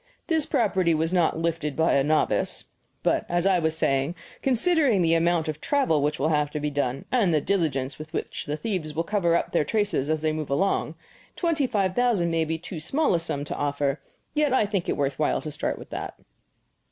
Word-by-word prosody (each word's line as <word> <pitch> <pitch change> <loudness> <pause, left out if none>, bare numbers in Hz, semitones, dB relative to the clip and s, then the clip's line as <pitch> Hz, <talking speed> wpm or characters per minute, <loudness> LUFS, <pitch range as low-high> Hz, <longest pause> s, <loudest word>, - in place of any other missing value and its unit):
This 320 -3 0
property 190 - +2
was 160 +3 0
not 175 -3 +2
'lifted' 165 -3 -2
by 160 +1 +2
a 140 - +3
novice. 155 +2 +1 0.4
But, - - +2
as 175 +1 +1
I 190 -2 +4
was 160 -1 0
saying, 135 +4 +1 0.3
considering 265 - +3
the 165 0 +3
amount 165 0 +2
of 155 0 -4
travel 265 - +2
which 150 +1 0
will 150 +4 +1
have 150 -2 +1
to 150 - -2
be 150 0 -2
done, 140 -2 -2
and 225 -8 +3
the 155 - +3
diligence 145 -7 -1
with 155 +1 -8
which - - -4
the 150 +1 -2
thieves 170 -7 -3
will 165 - 0
cover 175 -3 +1
up - - 0
their - - +2
traces 205 -5 0
as 155 -1 0
they 155 0 +1
move 155 -2 -4
along, 190 +8 0 0.4
twenty 325 -6 +1
five 195 -6 0
thousand 225 -8 +2
may 165 -1 +1
be 160 +1 -2
too 170 0 -7
small 270 - +1
a 170 - +2
sum 145 -3 -4
to - - -4
offer, 140 -1 -1 0.3
yet 295 -3 +2
I 220 - +3
think 200 -4 -2
it - - 0
worth 140 -1 -1
while 150 - +1
to 155 - -6
start 150 - -2
with - - -12
that." - - -5
165 Hz, 215 wpm, -25 LUFS, 150-200 Hz, 0.4 s, I